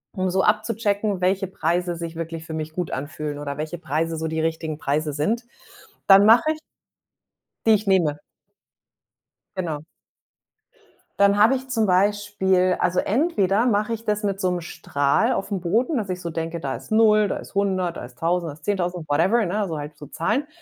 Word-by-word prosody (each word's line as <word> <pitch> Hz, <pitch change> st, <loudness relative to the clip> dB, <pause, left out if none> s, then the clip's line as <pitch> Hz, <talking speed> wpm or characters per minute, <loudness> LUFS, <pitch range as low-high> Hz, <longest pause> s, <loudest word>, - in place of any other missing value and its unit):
um 185 Hz, -1 st, 0 dB
so 190 Hz, +1 st, +1 dB
abzuchecken, 210 Hz, -2 st, 0 dB
welche 190 Hz, +2 st, +1 dB
Preise 175 Hz, -1 st, -1 dB
sich 165 Hz, 0 st, -6 dB
wirklich 165 Hz, 0 st, -5 dB
für 160 Hz, -, -7 dB
mich 155 Hz, 0 st, -4 dB
gut 175 Hz, 0 st, -3 dB
anfühlen 145 Hz, +1 st, -4 dB
oder 140 Hz, -1 st, -5 dB
welche 155 Hz, +3 st, -4 dB
Preise 165 Hz, +1 st, -1 dB
so 160 Hz, 0 st, -3 dB
die 160 Hz, 0 st, -2 dB
richtigen 160 Hz, -1 st, -2 dB
Preise 150 Hz, +1 st, -1 dB
sind. 210 Hz, -, -1 dB, 0.6 s
Dann 195 Hz, +1 st, +8 dB
mache 230 Hz, +8 st, +6 dB
ich 310 Hz, -, -11 dB, 1.1 s
Die -, -, +5 dB
ich 210 Hz, -1 st, +2 dB
nehme. 165 Hz, -7 st, +2 dB, 1.4 s
Genau. 160 Hz, -5 st, -3 dB, 1.3 s
Dann 200 Hz, 0 st, +5 dB
habe 220 Hz, +6 st, +6 dB
ich 265 Hz, 0 st, -5 dB
zum 225 Hz, -4 st, +1 dB
Beispiel 190 Hz, -1 st, +2 dB
also, 180 Hz, 0 st, +1 dB
entweder 220 Hz, -, +1 dB
mache 215 Hz, -1 st, +1 dB
ich 225 Hz, 0 st, -5 dB
das 210 Hz, -1 st, 0 dB
mit 200 Hz, -1 st, -1 dB
so 185 Hz, -, +1 dB
'nem 180 Hz, -1 st, -1 dB
Strahl 140 Hz, -4 st, 0 dB
aufm 195 Hz, -1 st, -3 dB
Boden, 230 Hz, -, +1 dB
dass 205 Hz, -, -3 dB
ich 185 Hz, -1 st, -3 dB
so 170 Hz, -2 st, -4 dB
denke: 165 Hz, +1 st, -4 dB
„Da 140 Hz, -4 st, -3 dB
ist -, -, -13 dB
0, 215 Hz, -1 st, +4 dB
da -, -, -2 dB
ist -, -, -10 dB
100, 185 Hz, -3 st, 0 dB
da -, -, -6 dB
ist 120 Hz, 0 st, -13 dB
1.000, 170 Hz, 0 st, 0 dB
da -, -, -5 dB
ist 150 Hz, +1 st, -19 dB
10.000, 180 Hz, -4 st, -2 dB
whatever, 185 Hz, +11 st, +3 dB
ne, 205 Hz, +3 st, -1 dB
so 160 Hz, -, -3 dB
halt 150 Hz, +1 st, -7 dB
so 145 Hz, -, -10 dB
Zahlen. 260 Hz, -, -1 dB
185 Hz, 185 wpm, -23 LUFS, 160-205 Hz, 1.4 s, Dann